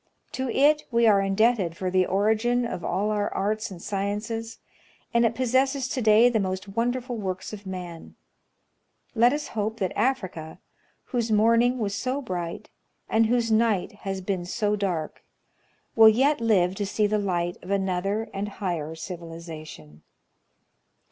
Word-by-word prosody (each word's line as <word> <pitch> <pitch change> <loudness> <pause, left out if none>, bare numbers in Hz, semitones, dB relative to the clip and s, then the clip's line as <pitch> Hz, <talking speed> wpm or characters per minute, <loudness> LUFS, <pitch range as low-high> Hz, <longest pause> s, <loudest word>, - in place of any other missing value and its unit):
To 260 -1 -3
it 300 +4 +3
we 235 -1 +3
are 205 -3 +5
indebted 195 -3 +1
for 185 -1 -2
the 185 -1 +2
origin 220 +5 +1
of 180 -7 -5
all 200 +6 0
our 205 -1 -1
arts 215 +3 -1
and 185 -3 -9
sciences, 210 +4 -3 0.6
and 235 0 +4
it 230 - -4
possesses 260 +2 +1
to 255 - -2
day 220 +1 +6
the 235 -3 +2
most 190 0 -3
won 230 +5 0
dei'ful 250 -1 -5
works 190 -1 -4
of 205 -2 -9
man. 180 -3 -7 1.0
Let 240 +1 +5
us 295 +1 -3
hope 220 +1 -2
that 190 -5 -2
Africa, 190 -10 -2 0.4
whose 235 -3 -2
morning 230 +4 +4
was 205 -4 -2
so 255 +6 -2
bright, 180 -9 -5 0.4
and 220 0 +3
whose 235 -1 +1
night 220 -4 +2
has 195 -2 -5
been 185 -1 -2
so 210 +3 0
dark, 180 -6 -3 0.7
will 225 -1 +9
yet 265 +4 +2
live 190 -6 +3
to 205 - -1
see 210 +1 +1
the 210 +1 +1
light 175 -3 -1
of 180 - -11
another 195 +2 -1
and 200 +1 -3
higher 170 -6 -4
civilization. 165 - -9
210 Hz, 155 wpm, -25 LUFS, 185-230 Hz, 1.0 s, will